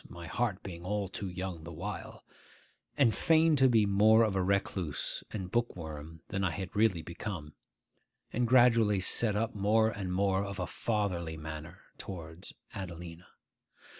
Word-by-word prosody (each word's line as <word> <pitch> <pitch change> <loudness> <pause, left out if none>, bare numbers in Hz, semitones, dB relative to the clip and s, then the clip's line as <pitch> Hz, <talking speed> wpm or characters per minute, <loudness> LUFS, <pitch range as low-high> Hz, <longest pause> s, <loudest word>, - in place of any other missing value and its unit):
my 85 -1 -9
heart 105 +1 -1
being 85 -3 -7
all 100 +1 -1
too 95 +1 -5
young 90 -2 -5
the 85 - -8
while), 95 +6 -6 0.7
and 125 -6 +4
feigned 160 -2 +4
to 135 -1 +6
be 110 -3 +4
more 105 +3 +5
of 105 -3 +1
a 95 - +2
recluse 95 -4 -1
and 95 -4 -5
bookworm 80 -9 -3
than 95 +1 -2
I 95 - +2
had 95 +2 -6
really 105 -6 +2
become, 85 -3 -6 0.8
and 120 +1 +1
gradually 115 -5 +5
set 105 +3 +3
up 110 +2 0
more 110 +2 +3
and 95 -4 -4
more 95 +1 +1
of 100 -1 -5
a 90 - -2
fatherly 90 -6 -2
manner 75 0 -8 0.2
towards 85 -1 -8 0.2
Adelina. 85 -3 -7
95 Hz, 155 wpm, -31 LUFS, 85-110 Hz, 0.8 s, to